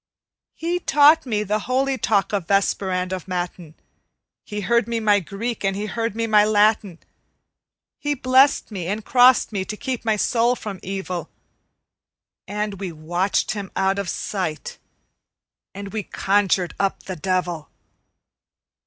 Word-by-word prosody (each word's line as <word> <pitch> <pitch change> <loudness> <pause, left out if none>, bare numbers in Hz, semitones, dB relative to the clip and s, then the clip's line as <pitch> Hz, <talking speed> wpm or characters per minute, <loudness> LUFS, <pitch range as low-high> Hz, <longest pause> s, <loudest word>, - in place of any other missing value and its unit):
He 345 +2 -2
taught 295 -2 +5
me 210 -3 0
the 210 +1 -1
holy 265 +1 +1
talk 210 -5 0
of 195 -5 -1
Vesper 195 -1 +1
and 185 0 -1
of 185 -1 -5
Matin, 175 -3 -5 0.7
He 210 0 -5
heard 235 +2 +2
me 235 -1 -1
my 210 -2 +3
Greek 205 +6 -5
and 195 -1 0
he 205 +2 -3
heard 225 +1 -3
me 230 0 -1
my 215 -2 +5
Latin, 210 -3 +2 1.0
He 290 0 -1
blessed 260 0 +3
me 185 -5 -5
and 210 +3 -3
crossed 250 -1 +5
me 200 -3 -2
to 210 +2 -6
keep 260 -1 -4
my 220 -2 +1
soul 235 +3 +2
from 205 -5 -7
evil, 190 -2 -5 1.2
And 210 -1 -3
we 190 -3 -4
watched 175 +5 -1
him 200 -3 -5
out 195 +1 +1
of 200 -3 -3
sight, 180 -6 -4 1.0
and 200 0 -7
we 220 - -1
conjured 195 -3 0
up 195 -1 -1
the 185 - -6
devil! 175 -2 -2
205 Hz, 150 wpm, -22 LUFS, 190-230 Hz, 1.2 s, taught